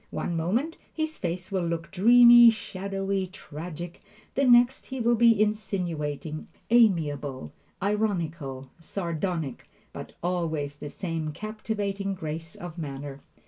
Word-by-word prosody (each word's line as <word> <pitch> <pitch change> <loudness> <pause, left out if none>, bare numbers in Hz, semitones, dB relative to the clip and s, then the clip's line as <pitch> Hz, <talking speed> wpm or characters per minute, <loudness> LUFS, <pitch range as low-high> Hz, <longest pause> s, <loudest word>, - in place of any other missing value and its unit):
One 175 - -3
moment 225 - -1
his 315 0 -3
face 175 +2 -3
will 185 -3 0
look 170 0 -3
dreamy, 240 +4 +8
shadowy, 195 -2 -2
tragic; 170 -1 -8 0.3
the 275 - +2
next 245 +1 +5
he 265 -1 -5
will 235 0 +3
be 230 -2 +5
insinuating, 175 -8 -2 0.2
amiable, 150 - +2 0.3
ironical, 170 -11 -2
sardonic; 165 -4 -3 0.2
but - - -8
always 160 -5 -1
the 145 - -7
same 165 -3 -4
captivating 205 0 -3
grace 165 -1 -6
of 175 -1 -8
manner. 140 -2 -6
180 Hz, 115 wpm, -27 LUFS, 155-215 Hz, 0.3 s, dreamy